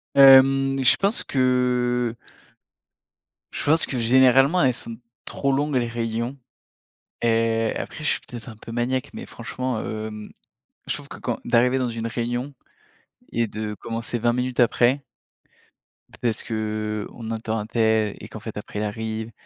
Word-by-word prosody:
Hem, 135 0 +7
je 130 - +7
pense 200 +4 +3
que 125 -2 +1 1.4
je - - -5
pense 160 +2 +4
que, 125 - -3
généralement, 130 +7 +5
elles 130 -2 +3
sont 115 -1 -6 0.3
trop 140 - -1
longues, 145 +1 0
les 120 -2 +1
réunions 115 +3 -3 0.8
et 115 -1 +1
après, 160 - -6
je 150 - +1
suis - - +1
peut-être 120 -1 -8
un 110 - -10
peu 115 +2 -11
maniaque, 120 +2 -1
mais - - -7
franchement, 125 0 -4
hem, 110 -1 -6 0.6
je - - 0
trouve - - -9
que - - -9
quand - - -3
d'arriver 125 +2 +3
dans 130 -1 -1
une 115 -1 -4
réunion 120 +3 -3 0.8
et 115 -1 0
de 105 0 -5
commencer 115 +2 -4
20 120 +1 +2
minutes 125 0 -2
après 125 +3 +3 1.2
parce 115 -3 0
qu'on 110 0 -4
attends 110 0 -3
untel 110 -1 +1
et - - -8
qu'en 110 - -9
fait 110 0 -8
après, 105 0 -6
il 105 - -1
arrive 110 +1 -4
120 Hz, 150 wpm, -23 LUFS, 110-130 Hz, 1.4 s, Hem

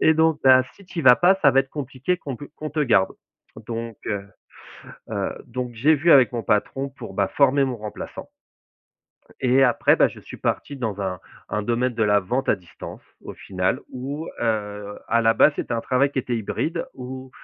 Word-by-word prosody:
et 160 - +5
donc, 160 -1 +3
bah, 130 -1 +7
si 200 - -17
tu 175 - -5
y - - -5
vas 125 -2 +8
pas, 180 +2 +5
ça 140 - +7
va 135 +1 +4
être 135 - -6
compliqué 140 +4 -2
qu'on 140 -7 -6
pe 145 - -9
qu'on 155 0 -5
te 155 +1 -2
garde». 115 -8 +3 0.5
Donc, 115 -1 -5
heu 100 -2 -2 0.9
heu, - - -2
donc, 125 0 -5
j'ai 145 +8 +4
vu 160 +3 +2
avec 130 -2 +6
mon 120 -2 -3
patron 125 +5 0
pour, 120 -7 -10
bah, 100 0 +1
former 140 0 +3
mon 130 -2 -3
remplaçant. 105 -2 -8 1.1
Et 130 +1 +4
après, 120 -3 +4
bah, - - +4
je - - -11
suis - - -11
parti 145 - -2
dans 110 -6 -4
un 95 -2 -3 0.3
un 105 - -1
domaine 120 +3 0
de 115 - 0
la 105 0 +4
vente 120 +8 -2
à - - +4
distance, 90 -3 -11 0.2
au - - -8
final, 95 +7 -2
où, 140 +5 -5
heu, 105 -2 -3
à 115 0 +2
la 115 0 +4
base, 150 - +5
c'était - - -3
un 115 - -1
travail 140 +2 +1
qui - - -6
était 125 -1 -2
hybride 160 - -3
où 130 +1 -8
125 Hz, 205 wpm, -23 LUFS, 110-140 Hz, 1.1 s, vas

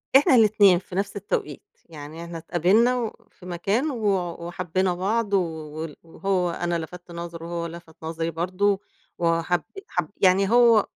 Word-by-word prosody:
إحنا 270 -1 +7
الإتنين 205 -5 +6
في 180 0 -11
نفْس 200 +1 -1
التوقيت، 185 -7 -3 0.3
يعني 155 +1 -9
إحنا 170 0 -7
اتقابلنا 190 +10 +3
و 230 -2 -5
في 180 - -17
مكان 200 - 0
و 230 -5 -4 0.4
وحبّينا 185 +1 0
بعض 205 +4 -1
و - - +6
وال 160 -2 -6
وهو 180 +1 -1
أنا 175 0 -1
لفَتت 175 +2 -9
نظرُه 170 -1 -7
وهو 170 0 -3
لفَت 165 -1 -11
نظري 165 +1 -2
برضه، 185 +4 +1 0.4
وحَب 165 0 +1 0.3
حَب 175 -3 -2
يعني 190 +1 +4
هو 235 -3 +6
180 Hz, 155 wpm, -25 LUFS, 165-200 Hz, 0.4 s, إحنا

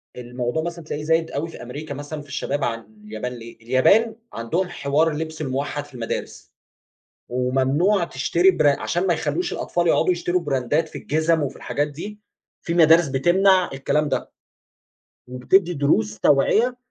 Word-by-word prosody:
الموضوع 125 +4 -3
مثلًا 170 -1 -6
تلاقيه 150 -1 -5
زايد 160 +1 +1
أوي 155 +4 -3
في - - -11
أمريكا 145 +5 -7
مثلًا 145 +2 -6
في 145 - -15
الشباب 140 0 -3
عن 115 -1 -1 0.3
اليابان 110 +4 -5
ليه؟ 115 -1 -10
اليابان 195 - +3 0.2
عندهم 165 +12 -1
حوار 150 +3 +1
اللبس 160 +1 -5
الموحد 145 +1 -3
في 145 - -19
المدارس، 115 -2 -6 0.8
وممنوع 135 +10 +1
تشتري 170 +5 +2
برا 145 -6 +2
عشان 175 +2 -1
ما 175 - +3
يخلّوش 155 +3 -2
الأطفال 175 0 -1
يقعدوا 180 - +3
يشتروا 175 +1 -1
براندات 145 +1 0
في - - -8
الجِزم 160 +1 +1
وفي 140 - -4
الحاجات 145 +1 -2
دي، 185 +9 -8 0.4
في 170 - -2
مدارس 165 -1 +6
بتمنع 180 +7 +3
الكلام 150 +2 0
ده، 135 - -3 1.0
وبتدي 170 +9 +2
دروس 110 -8 +1
توعية 215 - +3
150 Hz, 155 wpm, -22 LUFS, 130-170 Hz, 1.0 s, مدارس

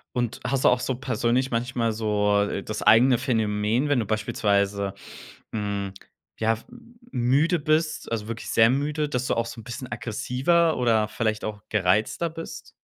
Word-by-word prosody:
Und 120 -1 -1
hast 130 +1 0
du - - +8
auch 125 - +3
so 130 0 -2
persönlich 125 0 0
manchmal 115 -1 0
so 105 -2 +1
das 110 +1 -5
eigene 125 +3 +6
Phänomen, 110 +2 0
wenn 145 -4 +3
du 110 - -1
beispielsweise, 100 -2 0 0.6
hm, 100 -2 -3 0.5
ja, 110 0 +2
f 115 - -9 0.5
müde 140 +7 +2
bist, 155 -2 0
also, 110 -2 -2
wirklich 115 0 -6
sehr 115 0 +5
müde, 145 +3 0
dass 125 -1 -2
du - - +1
auch 115 0 0
so 115 - -8
'n - - -16
bisschen 125 +3 -7
aggressiver 125 +9 +1
oder 115 -3 +2
vielleicht 110 -1 -2
auch 105 -1 -5
gereizter 105 - +1
bist? 165 +1 -8
115 Hz, 165 wpm, -25 LUFS, 105-130 Hz, 0.6 s, du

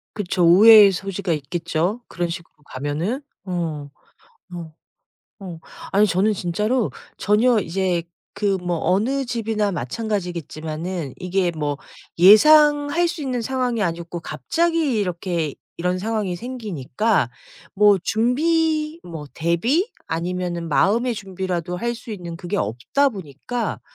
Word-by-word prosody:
그쵸. 185 -3 -1
오해의 205 +3 +8
소지가 195 -1 -3
있겠죠 170 - -2
그런 175 0 -3
식으로 170 0 -8 0.2
가면은. 155 - -2 0.2
어. 165 -5 -3 0.7
어. 165 -2 -7 0.7
어. 180 -4 -8 0.3
아니 205 +2 +5
저는 195 +4 +2
진짜로 210 +7 -1 0.3
전혀 220 +3 +3
이제 180 -1 -1 0.3
그 200 -2 +1
뭐 175 -1 -2
어느 260 +9 +1
집이나 225 -4 -1
마찬가지겠지만은 170 - -4
이게 180 0 0
뭐 150 -3 -3 0.4
예상할 295 - +6
수 330 - -5
있는 255 -4 -2
상황이 250 -3 -1
아니었고 170 -1 -3
갑자기 330 - 0
이렇게 175 -5 -2 0.2
이런 180 +1 -1
상황이 210 -3 -2
생기니까 215 - -1 0.4
뭐 205 -1 +5
준비 310 - +1
뭐 160 -4 -8
대비? 230 - +1 0.2
아니면은 175 0 -3
마음의 230 - +2
준비라도 185 -4 -4
할 235 +5 -2
수 225 - -11
있는 170 -4 -7
그게 175 +1 -4
없다 120 - +1
보니까 200 - -5
190 Hz, 270 characters per minute, -22 LUFS, 170-230 Hz, 0.7 s, 오해의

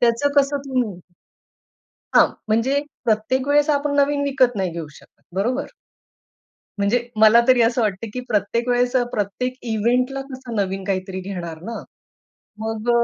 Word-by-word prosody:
त्याचं 240 +4 +2
कसं 280 +1 -1
तुम्ही 245 -9 -1 1.2
हां. - - +8 0.2
म्हणजे 245 +6 +2 0.2
प्रत्येक 235 +5 0
वेळेस 290 +1 +4
आपण 285 0 0
नवीन 285 0 +2
विकत 255 -4 +2
नाही 190 -2 -1
घेऊ 165 -1 -5
शकत. - - -20
बरोबर? 245 +8 0 1.1
म्हणजे 240 +4 +1
मला 220 +2 +7
तरी 255 -2 +5
असं 235 +1 +2
वाटतं, 210 +1 -1
की 250 - -3
प्रत्येक 230 +2 0
वेळेस 245 +1 +2
अ, 245 - +4
प्रत्येक 215 +5 -2 0.2
इव्हेंटला 250 +5 +1
कसं 255 -3 -7
नवीन 195 -2 -1
काहीतरी 190 -1 -2
घेणार 175 -4 -6
ना? 230 - -6 0.8
मग 220 +1 -3
235 Hz, 145 wpm, -21 LUFS, 205-260 Hz, 1.2 s, हां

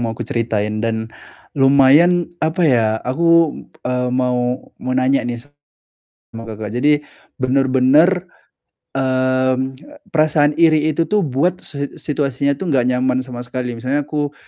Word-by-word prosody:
mau 115 -2 -3
aku - - -5
ceritain 110 -2 -2
dan 110 0 -3 0.4
lumayan, 145 +6 +4
apa 160 +3 0
ya, 120 -7 +3 0.2
aku, 165 +4 +3 0.3
eee, 125 0 -1
mau 125 0 -1
mau 130 - -3
nanya 130 +1 +2
nih 120 0 -5 0.7
sama 115 0 -12
Kakak, 110 0 -6
jadi 145 +3 +3 0.4
bener-bener, 135 +7 +3 0.7
mmm, 130 0 0 0.3
perasaan 150 -2 +2
iri 155 -2 +4
itu 160 +2 0
tuh 210 +3 +1
buat 165 +4 -1
se 140 -1 -6
situasinya 140 -1 -2
tuh 170 -1 -2
nggak 125 -2 +2
nyaman 125 0 +1
sama 125 -1 -8
sekali, 125 -1 -5
misalnya 130 +5 -1
aku 145 0 -3
130 Hz, 135 wpm, -18 LUFS, 125-150 Hz, 0.7 s, lumayan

